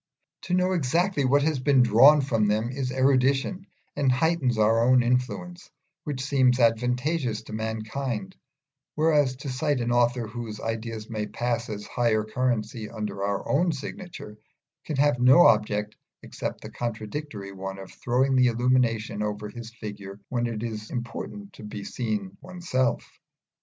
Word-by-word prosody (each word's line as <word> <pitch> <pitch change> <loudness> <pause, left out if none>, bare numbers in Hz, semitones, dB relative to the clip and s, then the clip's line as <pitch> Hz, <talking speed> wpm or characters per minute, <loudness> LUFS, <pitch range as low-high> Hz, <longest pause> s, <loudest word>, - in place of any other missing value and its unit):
To 180 - 0
know 185 0 +2
exactly 170 0 +1
what 140 +2 +3
has 155 -2 +1
been 135 -1 +4
drawn 135 +6 +7
from 115 -6 +1
them 110 +3 0
is 130 -1 -3
erudition 135 +7 +1 0.3
and 135 -2 +2
heightens 135 -3 +1
our 110 +2 +3
own 125 0 +5
influence, 125 +9 -2 0.4
which 140 -4 -3
seems 130 -3 +3
advantageous 125 +1 +1
to 110 - -10
mankind; 110 - -4 0.6
whereas 150 -4 +3
to 140 +2 -7
cite 130 +2 0
an 120 0 -1
author 120 0 +2
whose 110 -1 -6
ideas 115 -1 -4
may 110 -2 -3
pass 120 -1 -2
as 105 -1 -5
higher 115 -3 +1
currency 115 -1 -2
under 105 -3 -5
our 100 0 -2
own 170 +5 +2
signature 140 - -8 0.5
can 155 - -3
have 140 -2 +2
no 130 +8 +7
object 105 -1 +2 0.3
except - - -5
the - - -9
contradictory 110 -1 -5
one 95 0 -6
of 95 -1 -10
throwing 130 +2 +1
the 125 -1 +5
illumination 115 -3 +1
over 105 0 -3
his 115 0 -8
figure 105 -4 -8
when 120 -1 0
it 115 -1 -4
is 110 -2 -5
important 130 - -6
to - - -12
be 105 -1 -7
seen 105 -6 -3
oneself. 170 -9 -2
120 Hz, 150 wpm, -26 LUFS, 110-135 Hz, 0.6 s, drawn